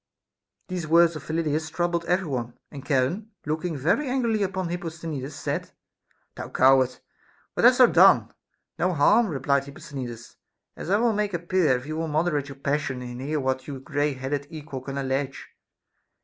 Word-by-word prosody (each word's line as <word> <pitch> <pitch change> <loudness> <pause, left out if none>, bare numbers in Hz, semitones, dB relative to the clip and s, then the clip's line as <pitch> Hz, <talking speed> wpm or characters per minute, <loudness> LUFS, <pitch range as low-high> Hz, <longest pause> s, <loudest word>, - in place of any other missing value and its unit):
These 180 -4 -4
words 170 +1 +5
of 155 - -6
Phyllidas 155 -1 -1
troubled 175 0 -1
every 180 +2 +1
one; 120 -5 -4
and 140 -3 -8
Cha 140 -3 +2
ron, 195 - -2 0.2
looking 155 +2 -2
very 180 - +1
angrily 235 -5 +1
upon 190 -2 -1
Hipposthenides, 160 -5 -5
said: - - -4 0.6
Thou - - -7
coward! 130 -1 +4 0.6
what - - +2
hast - - +7
thou - - +9
done? - - +5 0.5
No 180 +1 +1
harm, 210 +10 +5
replied 140 -3 0
Hipposthenides, 130 -4 -8 0.4
as - - -7
I 200 - +4
will 230 0 +2
make 205 -2 -1
appear 170 -5 +2
if 125 - -9
you 155 +1 -4
will 165 0 -2
mod 155 +2 +1
erate 145 -4 -1
your 140 - -8
passion 140 -2 -2
and 120 0 -7
hear 150 +3 -1
what 130 -1 -2
your 140 -3 -6
gray 145 +2 -1
headed 135 +2 -3
equal 150 -4 -7
can 135 +1 -6
allege. 135 0 -2
150 Hz, 175 wpm, -25 LUFS, 135-175 Hz, 0.6 s, thou